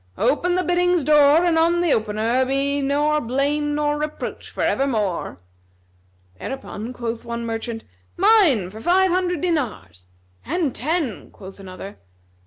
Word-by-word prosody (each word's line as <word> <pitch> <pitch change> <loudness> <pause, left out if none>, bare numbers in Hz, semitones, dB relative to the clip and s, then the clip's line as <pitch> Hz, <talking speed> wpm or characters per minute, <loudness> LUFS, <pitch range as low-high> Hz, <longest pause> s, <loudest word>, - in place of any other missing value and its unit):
Open 355 +4 +1
the 365 - +1
biddings' 355 -1 +2
door 300 +3 +5
and 330 -2 +3
on 340 +1 +3
the 345 -4 +2
opener 220 +4 0
be 275 +2 0
nor 295 +2 +1
blame 285 +4 -1
nor 295 0 0
reproach 305 0 -5
for - - -4
evermore." 215 - -1 1.0
Thereupon 245 - -6
quoth 235 -2 -5
one 235 0 -5
merchant, 225 0 -4 0.3
"Mine 350 - +4
for 220 +2 -10
five 370 +5 +3
hundred 355 -3 0
dinars;" 210 - -3 0.4
"And 315 -3 -1
ten," 295 - -2
quoth 195 0 -12
another. 190 +1 -10
280 Hz, 135 wpm, -22 LUFS, 225-330 Hz, 1.0 s, door